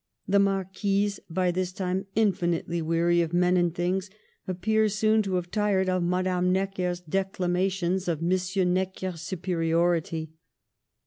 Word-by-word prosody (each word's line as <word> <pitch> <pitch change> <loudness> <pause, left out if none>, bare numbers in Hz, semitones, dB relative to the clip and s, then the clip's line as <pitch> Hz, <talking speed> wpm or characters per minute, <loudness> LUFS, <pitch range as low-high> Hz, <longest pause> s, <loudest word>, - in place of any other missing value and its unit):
The 200 +1 +4
marquise, 195 +1 0
by 180 +1 +1
this 185 +1 -2
time 190 +1 -2
infinitely 175 -5 +1
weary 170 +2 +2
of 165 0 -2
men 180 +1 +3
and 175 -1 +2
things, 180 +3 -1 0.4
appears 215 +3 +1
soon 215 0 +3
to 195 -3 -2
have 180 -1 -3
tired 200 -3 +1
of 185 0 +1
Madame 180 +1 +1
Necker's 185 -2 -1
declamations 185 +1 -1
and 165 -3 0
M. 185 +1 +1
Necker's 185 -2 -2
superiority. 165 -2 0
185 Hz, 130 wpm, -27 LUFS, 175-195 Hz, 0.4 s, The